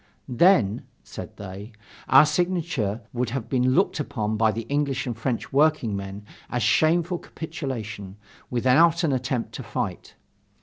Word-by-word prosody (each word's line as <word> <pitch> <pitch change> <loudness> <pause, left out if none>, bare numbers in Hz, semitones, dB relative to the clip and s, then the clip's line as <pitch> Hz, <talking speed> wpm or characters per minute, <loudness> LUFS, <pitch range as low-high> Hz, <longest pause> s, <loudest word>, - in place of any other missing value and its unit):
"Then," 125 - +3 0.2
said - - -9
they, 100 +3 -8 0.4
"our 135 +3 +8
signature 160 - -1
would 125 -1 -1
have 125 -2 -4
been 130 0 +2
looked 190 -2 +2
upon 110 -7 -2
by 110 0 +3
the 115 +1 -4
English 140 +2 -1
and 120 -3 -3
French 115 +2 -3
workingmen 105 -10 +1 0.2
as 120 -2 -1
a - - +2
shameful 170 - +2
capitulation, 115 - -6 0.3
without 150 +8 +4
an 160 - +2
attempt 130 -2 -2
to - - -6
fight. - - -5
125 Hz, 140 wpm, -25 LUFS, 110-155 Hz, 0.4 s, our